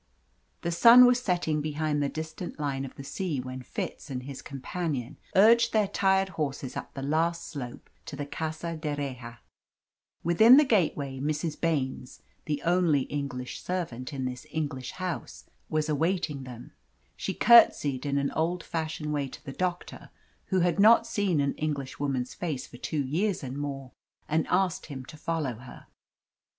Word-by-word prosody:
The 170 - -1
sun 235 +8 +9
was 245 0 +4
setting 175 -7 0
behind 150 0 -1
the 140 - 0
distant 160 +3 -6
line 135 -2 -2
of 130 - -10
the 140 - -8
sea 160 0 -3
when 130 0 -6
Fitz 135 - -6
and 125 -2 -4
his 135 0 -7
companion 140 -2 -4 0.2
urged 235 +4 +6
their 215 -2 +3
tired 190 0 +2
horses 140 -6 -4
up - - -7
the 135 - -5
last 165 +4 0
slope 125 -5 -7 0.2
to - - -6
the 145 0 -4
Casa 160 +3 -4
d'Erraha. 140 -6 -5 0.9
Within 220 +10 +7
the 300 - +7
gateway 150 - +1
Mrs. 150 +2 -2
Baines, 135 -6 -2 0.2
the 150 -1 -2
only 170 -4 +3
English 140 -3 -4
servant 160 -8 -4
in 135 -2 -3
this 125 +3 -5
English 145 -5 -4
house, 185 -2 -5 0.2
was 155 -1 0
awaiting 155 -2 -1
them. 120 -2 -10 0.4
She 190 - -4
curtsied 145 - +6
in 140 -1 0
an 140 0 0
old 165 +3 -1
fashioned 155 -2 -3
way 145 -2 -1
to - - -12
the 135 - -6
doctor, 180 +1 -4 0.4
who 190 -2 +1
had 175 +1 +1
not 230 +3 +7
seen 200 -8 0
an 140 0 +1
Englishwoman's 140 -3 -2
face 150 -7 -4
for 120 - -13
two 145 +3 -2
years 180 +6 -1
and 130 0 -5
more, 140 -2 -5 0.4
and 155 +1 +1
asked 185 -3 +1
him 135 -4 -7
to 155 - -11
follow 150 -6 -2
her. 125 +1 -12
150 Hz, 160 wpm, -28 LUFS, 135-175 Hz, 0.9 s, sun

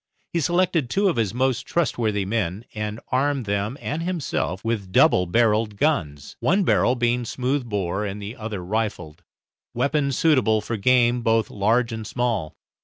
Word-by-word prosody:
He 170 - +1
selected 170 -4 +1
two 200 +7 +2
of - - -1
his 110 -5 +1
most 130 +1 0
trustworthy 110 - 0
men, 100 0 -2
and 105 0 -4
armed 135 -1 +1
them 100 +5 -2
and 155 +3 -3
himself 165 - -2
with 105 -5 -2
double 90 -1 +4
barrelled 110 +1 +2
guns, 80 - -1
one 195 +3 +2
barrel 125 -7 +3
being 120 0 +1
smooth 125 +2 -2
bore 100 -1 -1
and 100 0 -4
the 105 +3 -7
other 110 -6 -6
rifled, 95 -6 -3 0.5
weapons 140 -2 0
suitable 130 -9 +3
for 115 +2 -4
game 120 +2 +3
both 115 -1 +1
large 115 +4 +1
and 110 -2 -5
small. 115 -10 -2
115 Hz, 160 wpm, -23 LUFS, 105-130 Hz, 0.5 s, double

